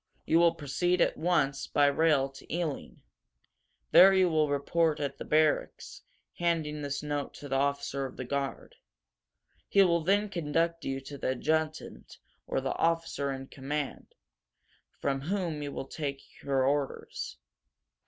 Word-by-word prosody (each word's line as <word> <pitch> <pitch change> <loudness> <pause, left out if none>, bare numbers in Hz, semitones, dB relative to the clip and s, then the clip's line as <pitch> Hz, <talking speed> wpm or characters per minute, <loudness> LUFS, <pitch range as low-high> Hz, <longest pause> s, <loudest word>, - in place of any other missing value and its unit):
"You 165 - +4
will 170 -1 +4
proceed 165 +5 0
at - - +3
once, 155 -5 0
by 145 - +3
rail, 145 -1 +3
to 135 - -14
Ealing," 165 -2 0
he - - -11
said. - - -27 0.9
"There 195 +2 +9
you 185 -1 +4
will 155 -2 +2
report 150 +2 +1
at 140 -2 -3
the - - -6
barracks, 155 0 0 0.4
handing 160 -3 0
this 140 0 -3
note 145 -1 -3
to 145 - -9
the 135 -1 0
officer 140 0 -1
of 130 - -13
the 130 - -5
guard. 140 +1 -3 1.0
He 200 - +6
will 170 -2 +2
then 200 +4 +2
conduct 165 -1 -1
you 135 0 -2
to 140 +1 -9
the 130 - 0
adjutant 155 0 -2 0.3
or - - -1
the 135 - -2
officer 165 -4 0
in 135 0 -5
command, 140 +1 -5 0.8
from 135 -1 -1
whom 170 -2 -2
you 145 -1 -4
will - - -5
take 140 -2 -6
your 135 -2 +1
orders." 140 0 -2
150 Hz, 155 wpm, -30 LUFS, 140-165 Hz, 1.0 s, There